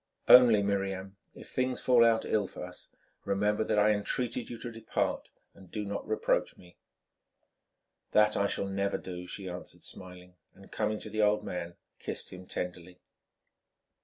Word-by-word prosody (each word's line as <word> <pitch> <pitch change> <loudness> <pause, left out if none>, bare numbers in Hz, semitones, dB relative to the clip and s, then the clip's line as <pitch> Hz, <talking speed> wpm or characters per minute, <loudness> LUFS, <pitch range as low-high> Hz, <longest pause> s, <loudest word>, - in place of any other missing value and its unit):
Only, 120 -5 +8
Miriam, 95 -1 -2 0.2
if - - -12
things 130 0 0
fall 125 -2 +5
out 115 -1 +3
ill 105 -2 +1
for - - -7
us, - - -11 0.3
remember 105 +2 +1
that 110 -1 0
I 105 +1 +5
entreated 115 +4 -2
you 120 - -6
to 120 +1 -6
depart, 115 0 -2 0.2
and 95 -2 -16
do 105 +2 -4
not 100 0 -4
reproach 110 - 0
me." 90 -1 -17 1.4
"That 105 0 +4
I 100 - +2
shall 100 - -2
never 100 0 -1
do," 90 -1 -7
she 95 0 -6
answered, 90 0 -8
smiling, 90 -1 -9 0.2
and 95 - -16
coming 105 0 -1
to - - -7
the 110 - 0
old 105 0 +3
man 85 -1 -5 0.2
kissed - - -6
him 90 0 -10
tenderly. 90 0 -5
100 Hz, 160 wpm, -30 LUFS, 95-110 Hz, 1.4 s, Only